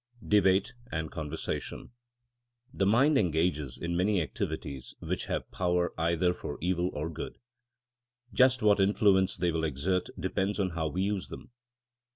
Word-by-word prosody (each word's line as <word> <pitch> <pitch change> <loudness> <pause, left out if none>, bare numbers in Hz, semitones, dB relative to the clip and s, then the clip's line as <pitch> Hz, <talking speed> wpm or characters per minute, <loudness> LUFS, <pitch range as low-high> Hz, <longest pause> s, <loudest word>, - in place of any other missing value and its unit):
VI - - -11
DEBATE 95 -2 +4 0.2
AND 80 -1 -3
CONVERSATION 80 +6 -5 0.8
THE 95 - +1
mind 135 +7 +4
engages 80 -6 0
in 85 0 -3
many 95 +2 +2
activities 70 -4 -4
which - - -3
have - - -3
power 90 -1 0
either 85 +2 +1
for 75 - -6
evil 90 0 0
or 75 +2 -3
good. 85 0 -6 1.0
Just 130 -2 +4
what 105 -1 +5
influence 95 -1 +3
they 90 -1 +1
will 80 0 -1
exert 80 +5 0
depends 95 +3 -1
on 95 -2 +1
how 80 -1 -1
we 90 +5 -1
use 100 -1 -1
them. - - -10
90 Hz, 150 wpm, -30 LUFS, 80-100 Hz, 1.0 s, what